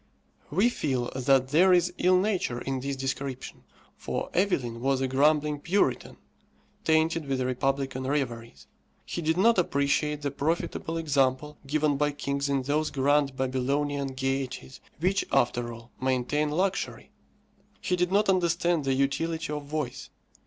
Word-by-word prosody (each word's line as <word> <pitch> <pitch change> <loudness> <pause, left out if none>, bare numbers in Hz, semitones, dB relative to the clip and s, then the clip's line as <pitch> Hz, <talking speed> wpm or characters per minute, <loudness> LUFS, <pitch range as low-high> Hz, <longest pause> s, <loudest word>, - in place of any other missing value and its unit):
We 195 - +3
feel 130 - -2
that 130 0 +3
there 175 +6 +5
is 180 0 +3
ill 185 +1 +4
nature 185 - 0
in 135 +1 -3
this 140 +1 -3
description, 135 0 -5 0.3
for - - -4
Evelyn 130 - 0
was 135 0 +1
a 135 - 0
grumbling 150 +2 +2
Puritan, 190 +7 0 0.7
tainted 160 -1 +2
with 135 -1 -1
republican 130 +1 -1
reveries. 120 -5 -3 0.4
He 175 - -4
did 160 +1 0
not 225 +2 +4
appreciate 150 -1 0
the 140 - -1
profitable 160 +2 -2
example 145 -2 0
given 150 0 +1
by 145 0 +1
kings 140 0 -2
in 135 -1 0
those 150 +3 0
grand 140 0 +2
Babylonian 135 +1 -1
gaieties, 135 0 -3 0.2
which, 190 +4 +1
after 120 0 +1
all, 115 +1 -12
maintain 130 +4 0
luxury. 185 +5 -2 0.7
He 180 - 0
did 180 0 0
not 205 +2 +3
understand 170 -4 +1
the 135 -1 +1
utility 160 +4 -1
of 150 -1 -5
vice. 145 -4 -4
145 Hz, 140 wpm, -27 LUFS, 130-165 Hz, 0.7 s, there